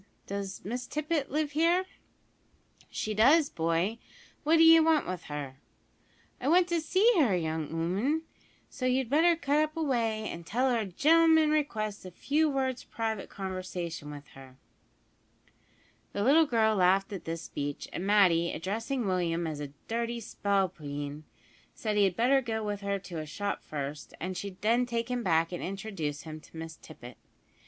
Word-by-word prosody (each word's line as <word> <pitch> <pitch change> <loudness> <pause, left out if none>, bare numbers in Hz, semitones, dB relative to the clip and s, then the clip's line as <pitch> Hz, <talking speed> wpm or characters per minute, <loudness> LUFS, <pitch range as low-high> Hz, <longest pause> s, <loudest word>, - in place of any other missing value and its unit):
Does 200 -1 -5
Miss 245 +4 -4
Tippet 305 -1 -1
live 300 0 -1
here?" 335 +5 +2 1.0
"She 215 - -3
does, 280 +8 +5
boy, 170 +7 0 0.4
what 315 +2 +4
d'ye 325 0 +8
want 320 -2 +3
with 185 -2 -5
her?" 145 -3 -6 0.8
"I 255 - -3
want 350 +3 +5
to 340 -1 +1
see 375 +7 +2
her, 235 -11 +4
young 160 -2 -2
'ooman, 195 - 0 0.4
so 255 -2 -3
you'd 255 -1 0
better 335 +4 +5
cut 300 -1 +1
away 235 -8 0
up - - -4
an' 170 - -7
tell 250 +9 +1
her 235 - +2
a 220 - -2
gen'lm'n 320 - +4
requests 215 -9 -1
a 185 - -7
few 300 - +1
words 260 -2 -1
private 220 -3 -4
conversation 185 -5 -5
with 145 -1 -10
her." 130 -1 -14 1.6
The 200 - -1
little 305 +6 +5
girl 220 -4 +2
laughed 195 +2 +3
at 195 - -6
this 165 0 -4
speech, 145 0 -5
and 175 - -3
Matty, 185 -5 +4
addressing 225 - -3
Willie 180 -3 0
as 160 -3 -3
a 145 - -4 0.2
"dirty 235 +1 -2
spalpeen," 155 -9 -2 0.5
said 215 -2 -2
he 205 -1 +5
had 185 -2 0
better 265 +5 +3
go 220 -3 -3
with 205 -1 -3
her 200 0 -1
to 180 -4 -7
a 155 - -6
shop 200 +6 -3
first, 145 0 -6
and 185 +2 -4
she'd 195 0 -6
then 235 +3 +3
take 235 0 -2
him 245 -1 -1
back 165 -4 +2
and 175 - -5
introduce 185 -7 -4
him 155 -1 -8
to 160 - -15
Miss 160 0 -7
Tippet. 120 0 -12
210 Hz, 165 wpm, -29 LUFS, 170-270 Hz, 1.6 s, d'ye